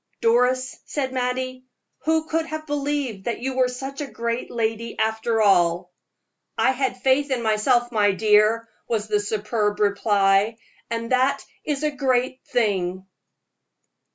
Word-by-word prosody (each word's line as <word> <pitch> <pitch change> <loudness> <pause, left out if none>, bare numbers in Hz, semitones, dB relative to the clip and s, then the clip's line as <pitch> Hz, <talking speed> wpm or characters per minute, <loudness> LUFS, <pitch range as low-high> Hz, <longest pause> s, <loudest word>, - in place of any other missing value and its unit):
"Doris," 250 +2 +2
said 265 -3 -2
Mattie, 255 0 -2 0.4
"who 320 0 +2
could 325 0 -1
have 310 0 -5
believed 285 -8 -2
that 235 - -1
you 260 +2 -3
were 255 -1 +3
such 270 +3 -6
a 290 - -3
great 235 +2 -3
lady 225 0 -2
after 220 0 +1
all?" 175 -3 +3 0.7
"I 260 - +4
had 265 -1 -2
faith 270 +2 +3
in 255 -3 -1
myself, 240 +3 +2
my 210 -3 +3
dear," 215 +3 +3 0.2
was 220 -2 -1
the 210 -1 +1
superb 210 0 -1
reply, 200 +1 +2 0.3
"and 230 +1 -3
that 260 +2 +2 0.2
is 295 -1 -2
a 300 - +1
great 260 -2 0
thing!" 190 -6 0
235 Hz, 140 wpm, -23 LUFS, 215-260 Hz, 0.7 s, I